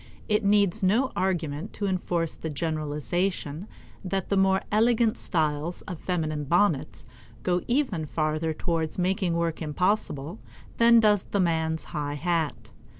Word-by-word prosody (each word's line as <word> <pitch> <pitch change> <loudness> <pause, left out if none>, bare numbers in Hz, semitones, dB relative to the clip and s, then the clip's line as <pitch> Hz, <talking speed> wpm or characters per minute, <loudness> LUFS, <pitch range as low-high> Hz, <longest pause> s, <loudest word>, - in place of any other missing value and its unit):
It 210 0 +2
needs 200 0 +3
no 225 +8 +2
argument 170 -3 -2
to 205 - -3
enforce 175 -3 -1
the 160 - -6
generalization 155 +3 -2 0.4
that 190 0 -2
the 200 - +2
more 190 0 +3
elegant 225 +1 +3
styles 155 0 -1
of 180 -5 -7
feminine 155 -5 -2
bonnets 170 -1 +1 0.4
go 180 +3 +1
even 235 - 0
farther 155 +1 -1
towards 160 0 -2
making 185 -1 0
work 170 -1 -1
impossible 155 - -1 0.4
than 235 0 +6
does 210 -2 +4
the 200 - -3
man's 160 -2 +1
high 145 -2 -2
hat. 165 -1 -2
175 Hz, 135 wpm, -26 LUFS, 155-200 Hz, 0.4 s, than